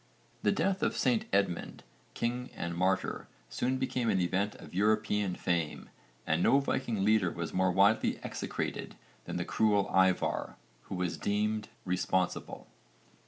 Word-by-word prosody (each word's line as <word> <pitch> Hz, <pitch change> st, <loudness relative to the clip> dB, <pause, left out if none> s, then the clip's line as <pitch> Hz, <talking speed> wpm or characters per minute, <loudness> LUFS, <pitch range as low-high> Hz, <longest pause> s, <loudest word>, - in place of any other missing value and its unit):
The 105 Hz, -, +3 dB
death 190 Hz, -, 0 dB
of -, -, 0 dB
St 220 Hz, -3 st, +2 dB
Edmund, 95 Hz, -4 st, 0 dB, 0.3 s
king 125 Hz, +2 st, -2 dB
and 85 Hz, 0 st, -3 dB
martyr, 95 Hz, +2 st, 0 dB, 0.2 s
soon 125 Hz, -, -1 dB
became 125 Hz, -3 st, -1 dB
an 95 Hz, -, +2 dB
event 95 Hz, +3 st, 0 dB
of -, -, -12 dB
European 105 Hz, -1 st, +1 dB
fame 85 Hz, -4 st, -2 dB, 0.3 s
and 80 Hz, +2 st, +1 dB
no 135 Hz, -, +5 dB
Viking 120 Hz, -7 st, -1 dB
leader 105 Hz, -4 st, +4 dB
was 85 Hz, -1 st, -5 dB
more 95 Hz, 0 st, +2 dB
widely 100 Hz, +4 st, +3 dB
execrated -, -, -4 dB, 0.3 s
than -, -, -4 dB
the -, -, -2 dB
cruel 105 Hz, -2 st, +2 dB
Ívarr, 95 Hz, -1 st, +2 dB, 0.3 s
who -, -, -5 dB
was 90 Hz, -2 st, -2 dB
deemed 105 Hz, +1 st, 0 dB, 0.2 s
responsible. 90 Hz, 0 st, -1 dB
100 Hz, 140 wpm, -31 LUFS, 90-110 Hz, 0.3 s, no